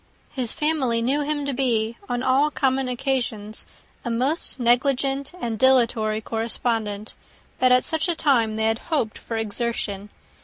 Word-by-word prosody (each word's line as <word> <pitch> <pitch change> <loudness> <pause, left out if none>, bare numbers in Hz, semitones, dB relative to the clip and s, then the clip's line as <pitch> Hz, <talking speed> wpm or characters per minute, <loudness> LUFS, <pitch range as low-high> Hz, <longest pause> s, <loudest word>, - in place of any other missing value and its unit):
His 250 -5 -2
family 295 -7 0
knew 275 +5 +1
him 290 0 -2
to 280 - -2
be, 235 -3 0
on 245 0 -2
all 270 +3 +3
common 265 -2 0
occasions, 240 -4 -3 0.4
a 240 - -3
most 260 +6 +3
negligent 270 +3 +1
and 230 -7 -3
dilatory 230 -4 +3
correspondent; 225 -2 -2 0.5
but 255 0 +4
at 250 0 +4
such 320 +2 -1
a 345 - 0
time 235 -9 +2
they 220 0 0
had 225 +1 +1
hoped 275 -10 -1
for 225 - -5
exertion. 210 -2 -3
245 Hz, 150 wpm, -23 LUFS, 225-270 Hz, 0.5 s, but